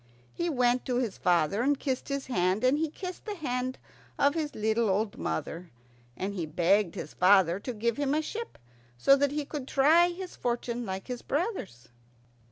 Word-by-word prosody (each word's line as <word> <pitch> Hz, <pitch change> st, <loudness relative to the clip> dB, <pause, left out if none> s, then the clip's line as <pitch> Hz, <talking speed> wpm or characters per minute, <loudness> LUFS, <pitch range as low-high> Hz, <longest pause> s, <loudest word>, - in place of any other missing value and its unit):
He 345 Hz, 0 st, -1 dB
went 250 Hz, -3 st, +2 dB
to 250 Hz, -, -1 dB
his 240 Hz, -5 st, -1 dB
father 175 Hz, +3 st, +2 dB
and 280 Hz, +2 st, +2 dB
kissed 265 Hz, -3 st, -2 dB
his 275 Hz, -1 st, -2 dB
hand, 185 Hz, -3 st, 0 dB
and 260 Hz, +4 st, +3 dB
he 320 Hz, -1 st, 0 dB
kissed 365 Hz, +3 st, -7 dB
the 420 Hz, -2 st, -4 dB
hand 255 Hz, -5 st, -2 dB, 0.4 s
of 285 Hz, -1 st, +3 dB
his 310 Hz, -2 st, -3 dB
little 220 Hz, +1 st, +1 dB
old 205 Hz, +2 st, 0 dB
mother, 165 Hz, -, -4 dB, 0.5 s
and 195 Hz, +2 st, -3 dB
he 175 Hz, -5 st, -3 dB
begged 175 Hz, +4 st, +2 dB
his -, -, -6 dB
father 185 Hz, -1 st, +4 dB
to 250 Hz, -, -5 dB
give 235 Hz, 0 st, -1 dB
him 285 Hz, 0 st, +1 dB
a 310 Hz, -, +2 dB
ship 460 Hz, +8 st, -6 dB, 0.4 s
so 275 Hz, -, +6 dB
that 285 Hz, 0 st, +2 dB
he 295 Hz, 0 st, -2 dB
could 280 Hz, -2 st, -6 dB
try 315 Hz, +6 st, +5 dB
his 360 Hz, +1 st, -6 dB
fortune 240 Hz, -1 st, -2 dB
like 190 Hz, 0 st, -4 dB
his 250 Hz, -2 st, -5 dB
brothers. 290 Hz, -, -3 dB
250 Hz, 185 wpm, -29 LUFS, 200-290 Hz, 0.5 s, so